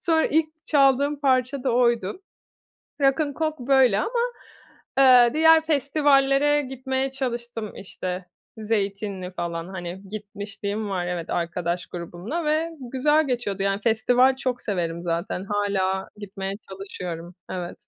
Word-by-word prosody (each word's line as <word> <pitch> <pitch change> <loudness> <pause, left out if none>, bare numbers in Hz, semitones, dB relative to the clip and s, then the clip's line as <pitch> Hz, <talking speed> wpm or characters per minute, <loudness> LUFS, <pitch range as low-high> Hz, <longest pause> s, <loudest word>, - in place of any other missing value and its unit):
Sonra 325 -2 +2
ilk 315 +1 +2 0.2
çaldığım 280 0 +3
parça 260 -1 +1
da 260 - +2
oydu. 235 - +1 0.8
Rock'n 285 +2 +2
Coke 310 -4 -3
böyle 260 -7 +5
ama, 475 - -1 0.8
eee, 250 -3 +7
diğer 320 0 +6
festivallere 285 -1 +3
gitmeye 265 0 -2
çalıştım. 240 -4 -4
İşte, 185 -1 -5 0.3
Zeytinli 200 -3 -2
falan, 170 -1 -4
hani, 180 0 -6
gitmişliğim 205 0 -5
var, 180 -2 -2
evet, 175 -2 -4
arkadaş 170 +1 -2
grubumla 180 - -5
ve 310 +2 +1 0.2
güzel 295 +3 +3
geçiyordu, 220 -6 -2
yani, 195 +1 0
festival 245 +4 +3
çok 255 -2 -2
severim 170 -4 -2
zaten. 175 +3 -2
Hâlâ 195 -2 0
gitmeye 195 -1 -5 0.2
çalışıyorum, 180 -3 -7 0.2
evet. 180 -1 -5
225 Hz, 120 wpm, -24 LUFS, 190-275 Hz, 0.8 s, eee